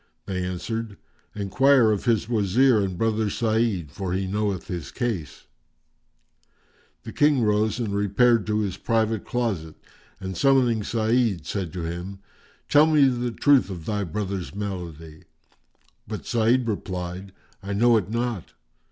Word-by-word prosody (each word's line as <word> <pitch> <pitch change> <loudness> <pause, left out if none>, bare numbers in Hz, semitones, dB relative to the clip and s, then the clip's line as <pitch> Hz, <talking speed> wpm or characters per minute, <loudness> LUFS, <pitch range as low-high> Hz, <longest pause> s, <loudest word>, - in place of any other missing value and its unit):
they 90 -2 -3
answered, 100 +4 -4 0.4
"Enquire 115 +4 +3
of 105 - -2
his 115 -3 +1
Wazir 115 +2 +3
and 95 -3 -2
brother 110 0 0
Sa'id, 110 - 0
for 95 +1 -4
he 95 +1 -1
knoweth 100 -1 -2
his 85 -6 -5
case." 110 - -4 1.6
The - - -8
King 145 -4 +3
rose 105 +1 +1
and 115 -5 -2
repaired 105 +3 +2
to 105 0 +1
his 100 -4 -3
private 110 -2 0
closet 100 -11 -2 0.4
and 95 0 -5
summoning 130 -5 +3
Sa'id 115 -3 0
said 95 -5 -3
to 90 -2 -4
him, 85 +4 -5 0.5
"Tell 150 +2 +5
me 150 -3 +5
the 125 -1 -2
truth 135 0 +3
of 85 -4 -7
thy 105 -2 -1
brother's 95 0 -4
malady." 85 -6 -6 0.8
But - - -6
Sa'id 120 +2 +2
replied, 95 -2 -4 0.3
"I 100 +1 -5
know 120 +3 +4
it 100 -3 -2
not." 115 -4 -3
105 Hz, 140 wpm, -24 LUFS, 95-115 Hz, 1.6 s, Tell